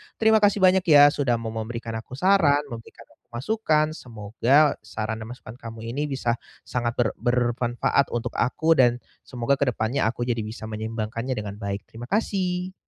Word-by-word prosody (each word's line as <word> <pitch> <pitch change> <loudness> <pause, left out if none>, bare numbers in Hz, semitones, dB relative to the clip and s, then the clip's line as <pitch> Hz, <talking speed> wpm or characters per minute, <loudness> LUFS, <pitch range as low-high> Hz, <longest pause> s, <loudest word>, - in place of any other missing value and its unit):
Terima 220 0 +4
kasih 205 -1 +2
banyak 185 0 +5
ya, 145 -1 +8
sudah 130 -5 0
mau 115 -1 -4
memberikan 115 +1 -5
aku 120 - -10
saran, 150 -3 +3
memberikan 115 -1 -10
aku - - -26
masukan, 155 - +1
semoga 120 +6 +1
saran 110 0 -4
dan 110 - -7
masukan 120 0 -10
kamu 115 -1 -8
ini 140 +5 -2
bisa 125 -4 -1 0.2
sangat 120 -1 -2
ber 120 - +2
bermanfaat 120 +2 +1
untuk 120 -1 -2
aku, 160 +6 +2
dan, 125 -2 +6 0.3
semoga 125 +2 -1
ke 140 - +1
depannya 110 +4 -1
aku 115 +2 -2
jadi 120 -1 0
bisa 110 0 -7
menyeimbangkannya 110 +3 -4
dengan 105 -3 -5
baik. 100 -1 -4
Terima 115 +2 -9
kasih. 185 - -1
120 Hz, 170 wpm, -24 LUFS, 115-150 Hz, 0.3 s, ya